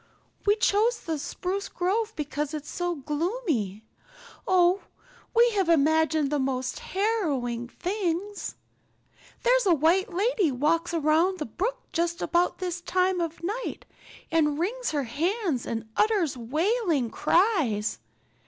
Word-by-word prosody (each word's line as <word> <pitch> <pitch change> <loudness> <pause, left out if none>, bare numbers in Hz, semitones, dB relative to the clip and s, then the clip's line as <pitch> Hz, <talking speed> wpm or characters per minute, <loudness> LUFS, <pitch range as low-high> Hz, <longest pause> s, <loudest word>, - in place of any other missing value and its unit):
We 410 - +6
chose 440 +2 +2
the 320 -3 -3
spruce 380 +7 -3
grove 425 +5 -1
because 295 0 -3
it's 300 -1 -6
so 350 -1 -2
gloomy. 295 - -2 0.6
Oh, 365 +1 +4 0.5
we 475 +1 +6
have 390 -5 +1
imagined 315 -1 +3
the 295 - +1
most 260 -1 -2
harrowing 295 - -1
things. 375 - -3 0.9
There's - - +4
a 350 - +6
white 345 +7 +2
lady 395 - +1
walks 315 +6 +1
along 330 +3 +2
the 305 - -3
brook 455 - -3
just 340 +1 0
about 350 +1 +1
this 360 -1 -3
time 365 0 +1
of 335 -1 -3
the 340 - -8 0.2
night - - -6 0.5
and 300 -3 +2
wrings 475 +10 -1
her 290 -2 -1
hands 320 - -1
and 225 -1 -3
utters 410 -10 +2
wailing 305 - 0
cries. 315 - +2
340 Hz, 130 wpm, -27 LUFS, 295-395 Hz, 0.9 s, We